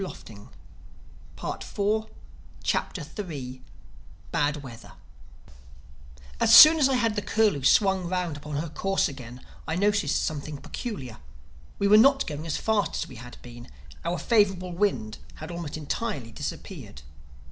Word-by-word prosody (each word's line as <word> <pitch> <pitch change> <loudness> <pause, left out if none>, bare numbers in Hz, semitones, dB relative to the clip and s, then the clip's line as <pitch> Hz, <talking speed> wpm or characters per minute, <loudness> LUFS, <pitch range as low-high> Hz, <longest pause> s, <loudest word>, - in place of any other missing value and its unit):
THE 110 - -9 0.9
THIRD 210 +2 -2 0.6
CHAPTER 165 -6 -1 1.3
BAD 150 -2 +1
WEATHER 120 -3 -11 1.5
AS 230 0 +6
soon 315 +1 +11
as 275 -2 +4
I 265 - +2
had 230 -3 +1
the 205 - -1
Curlew 205 -7 +1
swung 190 - +3
round 180 -4 -2
upon 150 +1 -7
her 155 +3 -3
course 195 +5 0
again 125 -3 -10 0.2
I 160 - -1
noticed 205 -5 +1
something 150 -1 -4
peculiar: 140 - -7 0.6
we 200 - +1
were 210 +1 +7
not 275 +4 +5
going 155 +1 -6
as 155 - -1
fast 215 -3 0
as - - -3
we - - -11
had 125 +1 -11
been. 120 0 -11 0.4
Our 170 +1 -1
favorable 195 -4 +1
wind 170 - -1 0.2
had 155 +2 -8
almost 170 -3 -5
entirely 150 - -4
disappeared. 70 -9 -7
175 Hz, 135 wpm, -26 LUFS, 145-210 Hz, 1.5 s, soon